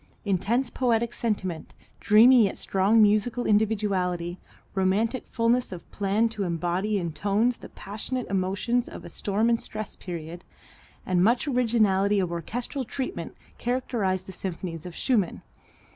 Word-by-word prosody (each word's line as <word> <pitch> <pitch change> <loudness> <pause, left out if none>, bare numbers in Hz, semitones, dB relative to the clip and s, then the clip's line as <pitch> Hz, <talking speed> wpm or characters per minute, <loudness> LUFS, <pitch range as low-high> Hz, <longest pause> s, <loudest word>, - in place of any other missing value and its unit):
Intense 220 +6 0
poetic 235 -2 +1
sentiment, 190 -7 -3 0.2
dreamy 230 +2 +7
yet 195 - -3
strong 200 +4 +3
musical 215 +4 +2
individuality, 195 -5 0 0.3
romantic 200 +6 0
fulness 235 +1 +1
of 175 -2 -8
plan 205 +3 +1
to 220 -2 -6
embody 180 +4 -1
in 170 -4 -3
tones 210 +7 +1
the - - -11
passionate 225 +5 -5
emotions 195 +6 0
of - - -10
a - - -8
storm 210 +3 0
and 230 -1 +3
stress 215 -1 -6
period, 170 0 -7 0.6
and 180 -1 +2
much 240 +8 +2
originality 215 -6 +2
of 180 -3 -1
orchestral 235 - -4
treatment 265 - -5 0.2
characterize 235 -7 -1
the 190 - -10
symphonies 175 -2 -5
of 175 - -9
Schumann. 220 -9 0
205 Hz, 135 wpm, -26 LUFS, 185-235 Hz, 0.6 s, dreamy